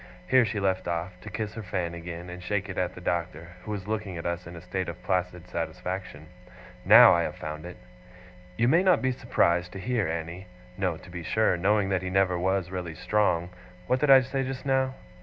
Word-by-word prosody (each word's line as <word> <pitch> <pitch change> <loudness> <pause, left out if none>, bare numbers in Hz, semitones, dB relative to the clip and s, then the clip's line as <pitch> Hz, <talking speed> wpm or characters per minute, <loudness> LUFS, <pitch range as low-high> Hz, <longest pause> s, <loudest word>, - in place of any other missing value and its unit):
Here 130 -2 +5
she 105 0 -2
left 95 -2 0
off, 85 +1 -2
to - - -8
kiss 110 -2 -4
her 110 - -6
fan 90 -4 -3
again, 85 0 -7
and 90 0 -8
shake 100 +2 -2
it 95 - -6
at 90 -1 -1
the 90 - -10
Doctor, 85 -1 -3
who 105 - -10
was 105 -2 -5
looking 105 -4 -3
at 85 - -7
us 85 0 -3
in 85 - -9
a 85 - -9
state 95 +1 -3
of 85 - -9
placid 90 -1 -1
satisfaction. 85 -1 -5 0.6
'Now - - +9
I - - +3
have - - -3
found 75 +2 -6
it. 90 - -10 0.8
"You 120 - +3
may 165 +7 +5
not 185 -6 +3
be 130 - +2
surprised 90 -8 +1
to 95 - -6
hear, 110 0 0
Annie," 85 +3 -5 0.3
no, 90 -4 -1
to 90 - -14
be 85 0 -6
sure, 110 +4 +2
knowing 100 +2 +2
that 95 -1 +1
he 95 - -4
never 95 -1 +2
was 95 0 0
really 90 -3 -5
strong; 90 -3 +1 0.3
what 125 +6 +1
did 150 - +1
I 135 -1 +9
say 135 +1 -2
just 130 +1 -5
now? 130 -1 +1
95 Hz, 220 wpm, -27 LUFS, 85-105 Hz, 0.8 s, Now